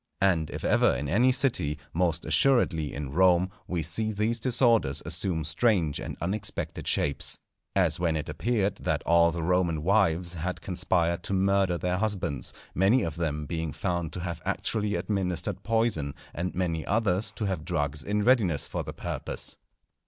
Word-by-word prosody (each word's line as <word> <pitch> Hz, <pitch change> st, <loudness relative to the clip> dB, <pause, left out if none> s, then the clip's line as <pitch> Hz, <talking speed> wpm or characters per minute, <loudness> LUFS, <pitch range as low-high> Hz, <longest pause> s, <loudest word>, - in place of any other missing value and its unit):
And 85 Hz, -5 st, +2 dB
if -, -, -6 dB
ever -, -, +3 dB
in 75 Hz, -, -3 dB
any 120 Hz, -, +4 dB
city, 90 Hz, -, +1 dB, 0.2 s
most 85 Hz, -1 st, 0 dB
assuredly 80 Hz, -, +2 dB
in 70 Hz, -1 st, -5 dB
Rome, 90 Hz, +2 st, +3 dB, 0.2 s
we 85 Hz, -3 st, -2 dB
see 110 Hz, +8 st, -1 dB
these 110 Hz, +3 st, 0 dB
disorders 115 Hz, -, +2 dB
assume 85 Hz, -5 st, -1 dB
strange 85 Hz, -1 st, +1 dB
and -, -, -6 dB
unexpected 100 Hz, +4 st, -2 dB
shapes. 70 Hz, -, +1 dB, 0.4 s
As -, -, +2 dB
when 85 Hz, -2 st, +1 dB
it 75 Hz, -1 st, -3 dB
appeared 100 Hz, +6 st, -1 dB
that -, -, -1 dB
all 85 Hz, 0 st, +5 dB
the 85 Hz, 0 st, -4 dB
Roman 85 Hz, -3 st, +1 dB
wives 90 Hz, -3 st, +2 dB
had 90 Hz, +2 st, -3 dB
conspired 85 Hz, -2 st, 0 dB
to -, -, -2 dB
murder 95 Hz, -1 st, +2 dB
their 90 Hz, +1 st, -1 dB
husbands, 95 Hz, -, -1 dB, 0.2 s
many 100 Hz, +7 st, +3 dB
of 80 Hz, -5 st, -3 dB
them 75 Hz, -3 st, -2 dB
being 80 Hz, 0 st, -3 dB
found 85 Hz, +2 st, -2 dB
to 90 Hz, -, -4 dB
have 85 Hz, -2 st, -4 dB
actually 105 Hz, +3 st, -1 dB
administered 95 Hz, -1 st, -2 dB
poison, 105 Hz, -11 st, 0 dB, 0.2 s
and 90 Hz, +2 st, -3 dB
many 85 Hz, -3 st, -1 dB
others 100 Hz, -1 st, +1 dB
to 110 Hz, -, -3 dB
have 95 Hz, -5 st, -2 dB
drugs 75 Hz, -4 st, -1 dB
in 105 Hz, +4 st, 0 dB
readiness 100 Hz, -, +3 dB
for -, -, -4 dB
the -, -, -7 dB
purpose. -, -, -5 dB
90 Hz, 165 wpm, -27 LUFS, 80-100 Hz, 0.4 s, all